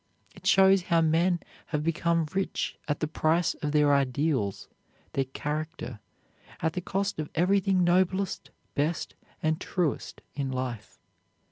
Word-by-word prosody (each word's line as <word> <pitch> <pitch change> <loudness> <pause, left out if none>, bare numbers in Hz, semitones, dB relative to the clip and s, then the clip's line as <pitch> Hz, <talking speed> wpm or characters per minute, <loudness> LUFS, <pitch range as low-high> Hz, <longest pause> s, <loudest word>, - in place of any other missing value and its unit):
It - - -8
shows 195 0 +6
how 170 -1 +2
men 170 +2 +2 0.3
have 150 -2 -1
become 165 0 +1
rich 195 0 -1
at 145 -1 -1
the 155 - +1
price 165 +2 +2
of 150 -2 -1
their 150 -1 +4
ideals, 135 -6 0 0.5
their 135 - +1
character, 150 -2 -4 0.6
at 160 0 0
the 180 - -2
cost 195 0 -2
of 155 - -3
everything 190 +1 +3
noblest, 185 +2 +1 0.2
best, 155 +4 -1 0.3
and 155 +2 +1
truest 175 -6 -2
in 140 -2 -2
life. 125 -5 -4
160 Hz, 135 wpm, -28 LUFS, 145-180 Hz, 0.6 s, shows